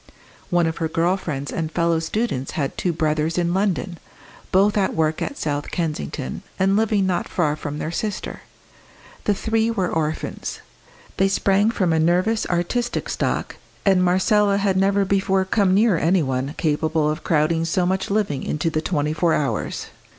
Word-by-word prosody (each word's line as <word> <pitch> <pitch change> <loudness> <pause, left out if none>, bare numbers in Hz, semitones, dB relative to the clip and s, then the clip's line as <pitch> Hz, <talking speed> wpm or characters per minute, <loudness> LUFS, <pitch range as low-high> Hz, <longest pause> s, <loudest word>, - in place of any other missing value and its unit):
One 175 -2 +3
of 160 0 -2
her 165 - -1
girl 170 +3 +1
friends 145 -7 -4
and 160 -1 -3
fellow 170 0 +1
students 165 - -2
had 145 -6 -2
two 180 - 0
brothers 155 0 0
in 175 -1 +1
London, 190 -2 -1 0.5
both 200 +2 +4
at 200 -2 +1
work 160 -1 0
at 280 - -3
South 145 -1 -2
Kensington, 150 - -3 0.2
and 195 +1 +2
living 215 -2 +2
not 185 -2 -1
far 155 -4 +1
from 150 -1 -5
their 155 - -3
sister. 205 +3 -4 0.8
The 205 - +2
three 225 +2 0
were 195 -6 -1
orphans. 155 -1 -3 0.6
They 195 - +4
sprang 195 +1 +2
from 185 -7 +1
a 160 - +2
nervous, 180 +7 +2
artistic 210 +8 -1
stock, - - -2 0.3
and 190 -2 +4
Marcella 200 +3 +3
had 200 -1 +1
never 195 +1 +2
before 195 0 +1
come 190 -1 +2
near 205 -4 +4
any 175 +1 +3
one 135 +2 -2
capable 155 0 +1
of 155 0 -2
crowding 160 +1 +2
so 175 +2 +1
much 190 +1 -1
living 195 -10 0
into 165 +2 -1
the 155 - 0
twenty 150 -3 -1
four 165 +1 +2
hours. 140 -3 -2
175 Hz, 170 wpm, -22 LUFS, 155-195 Hz, 0.8 s, both